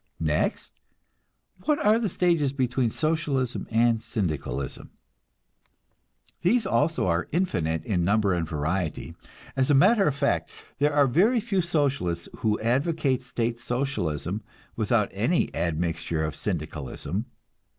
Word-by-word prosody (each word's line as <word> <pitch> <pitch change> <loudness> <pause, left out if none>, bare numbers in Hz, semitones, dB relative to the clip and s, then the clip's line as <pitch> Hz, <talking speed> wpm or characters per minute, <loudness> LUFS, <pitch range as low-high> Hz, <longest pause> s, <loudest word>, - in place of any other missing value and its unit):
Next, - - -1 0.8
what 300 -1 +3
are 215 -1 +3
the 220 -4 0
stages 165 -6 +1
between 125 -2 +1
Socialism 150 -3 -1
and 115 0 +3
Syndicalism? 80 - -3 1.5
These 215 +6 +3
also 165 - +1
are 85 -1 0
infinite 85 - 0
in 90 -5 0
number 100 +1 +2
and 85 -2 -2
variety. 80 +3 -2 0.4
As 130 0 +1
a 145 - +5
matter 195 +8 +5
of 145 - +1
fact, 140 0 0 0.3
there 145 +1 +3
are 145 -1 +4
very 195 - +3
few 205 -4 0
Socialists 140 - 0
who 110 -1 0
advocate 135 +3 +1
State 120 -2 -2
Socialism 110 - -2 0.3
without - - +1
any - - +1
admixture 80 -1 -1
of 75 - -4
Syndicalism. 85 - -3
125 Hz, 120 wpm, -26 LUFS, -, 1.5 s, a